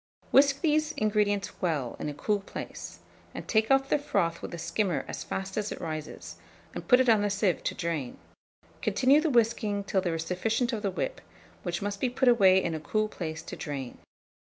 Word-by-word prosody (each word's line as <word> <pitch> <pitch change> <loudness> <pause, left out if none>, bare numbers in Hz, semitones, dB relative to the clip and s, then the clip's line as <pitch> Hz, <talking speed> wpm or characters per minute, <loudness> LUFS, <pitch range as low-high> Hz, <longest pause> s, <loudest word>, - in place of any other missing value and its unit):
Whisk 275 0 +5
these 310 -1 +2
ingredients 205 -3 0
well 150 -9 -1
in - - -3
a - - -5
cool 205 +8 0
place, 195 - -8 0.3
and - - -7
take 220 -1 +2
off 270 0 +3
the - - +3
froth 195 - 0
with - - -6
a 170 - -5
skimmer 170 +1 -1
as - - -5
fast 190 +1 -5
as 210 -1 -1
it - - -5
rises, 155 -2 -6 0.4
and - - -7
put 250 - +6
it 260 - +3
on 220 -3 +5
a 205 - +1
sieve 200 -2 0
to - - -1
drain; 160 -7 -3 0.6
continue 270 +3 +4
the 320 - +1
whisking 220 -4 +1
till 195 -1 0
there 175 -3 -1
is 165 0 -3
sufficient 225 +8 0
of 220 - -2
the 200 - 0
whip, - - -3 0.4
which 175 +1 -3
must 205 0 -3
be 255 - +2
put 255 +1 0
away 190 -6 +6
in 170 - -1
a 160 - -3
cool 215 +7 0
place 160 -6 -5
to - - -7
drain. 135 -5 -6
205 Hz, 205 wpm, -28 LUFS, 170-240 Hz, 0.6 s, put